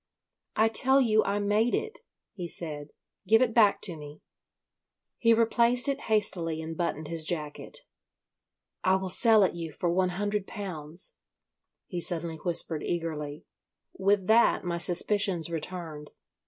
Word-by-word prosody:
"I 220 Hz, -, +4 dB
tell 265 Hz, +5 st, +4 dB
you 220 Hz, -4 st, +3 dB
I 200 Hz, -, 0 dB
made 210 Hz, +3 st, +1 dB
it," 440 Hz, 0 st, -4 dB, 0.3 s
he 180 Hz, -3 st, -6 dB
said. 150 Hz, -3 st, -6 dB, 0.4 s
"Give 225 Hz, +1 st, +5 dB
it 235 Hz, -3 st, -1 dB
back 215 Hz, -4 st, +4 dB
to 180 Hz, -5 st, 0 dB
me." 150 Hz, -1 st, -11 dB, 1.0 s
He 230 Hz, -, +4 dB
replaced 235 Hz, +2 st, +3 dB
it 275 Hz, -, -2 dB
hastily 175 Hz, -7 st, +2 dB
and 160 Hz, 0 st, -6 dB
buttoned 160 Hz, -2 st, -3 dB
his 165 Hz, 0 st, -1 dB
jacket. 155 Hz, -2 st, -5 dB, 1.0 s
"I 185 Hz, 0 st, +3 dB
will 190 Hz, -1 st, -3 dB
sell 220 Hz, +1 st, +4 dB
it 185 Hz, -, +1 dB
you 165 Hz, -2 st, -6 dB
for 170 Hz, +3 st, -2 dB
one 185 Hz, +1 st, +1 dB
hundred 205 Hz, -1 st, -2 dB
pounds," 175 Hz, -5 st, -6 dB, 0.7 s
he 175 Hz, -, -5 dB
suddenly 165 Hz, -1 st, -2 dB
whispered 165 Hz, -2 st, -1 dB
eagerly. 155 Hz, -3 st, -4 dB, 0.5 s
With 195 Hz, 0 st, +1 dB
that 225 Hz, +4 st, +4 dB
my 170 Hz, -1 st, -3 dB
suspicions 180 Hz, -1 st, +1 dB
returned. 160 Hz, -2 st, -6 dB
180 Hz, 140 wpm, -28 LUFS, 165-215 Hz, 1.0 s, Give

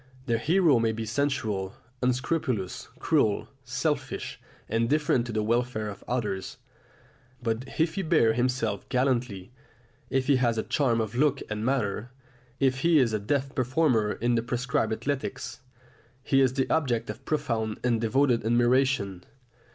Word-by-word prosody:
The 115 Hz, -3 st, +1 dB
hero 160 Hz, -2 st, +4 dB
may 115 Hz, -1 st, +1 dB
be 110 Hz, 0 st, -4 dB
sensual, 110 Hz, -6 st, -1 dB, 0.3 s
unscrupulous, 130 Hz, -, -1 dB
cruel, 105 Hz, -2 st, +1 dB
selfish, 130 Hz, +5 st, -2 dB, 0.3 s
indifferent 120 Hz, +2 st, +1 dB
to -, -, -4 dB
the 110 Hz, -1 st, 0 dB
welfare 115 Hz, -1 st, 0 dB
of 100 Hz, -, -9 dB
others. 105 Hz, -6 st, -2 dB, 0.8 s
But 115 Hz, 0 st, -2 dB
if 160 Hz, +1 st, +2 dB
he 195 Hz, -, -2 dB
bears 155 Hz, -10 st, +3 dB
himself 120 Hz, -5 st, -1 dB
gallantly, 125 Hz, -6 st, 0 dB, 0.6 s
if 135 Hz, -1 st, +1 dB
he 140 Hz, -1 st, +4 dB
has 120 Hz, -3 st, +1 dB
a 110 Hz, -, 0 dB
charm 120 Hz, -6 st, +1 dB
of 110 Hz, -1 st, -3 dB
look 140 Hz, +2 st, +2 dB
and 105 Hz, 0 st, -2 dB
manner, 120 Hz, -3 st, -1 dB, 0.5 s
if 135 Hz, -1 st, +2 dB
he 165 Hz, +2 st, +4 dB
is 125 Hz, -6 st, +3 dB
a 110 Hz, -, +1 dB
deft 135 Hz, +6 st, -1 dB
performer 130 Hz, -4 st, +2 dB
in 120 Hz, +1 st, 0 dB
the 115 Hz, -, +2 dB
prescribed 125 Hz, 0 st, -1 dB
athletics, 135 Hz, +4 st, -3 dB, 0.6 s
he 135 Hz, 0 st, +3 dB
is 130 Hz, -1 st, +3 dB
the 135 Hz, -, +1 dB
object 125 Hz, -7 st, +1 dB
of -, -, -12 dB
profound 115 Hz, -8 st, -1 dB
and 120 Hz, -2 st, +1 dB
devoted 125 Hz, +1 st, +2 dB
admiration. 120 Hz, -5 st, +2 dB
120 Hz, 145 wpm, -27 LUFS, 110-135 Hz, 0.8 s, hero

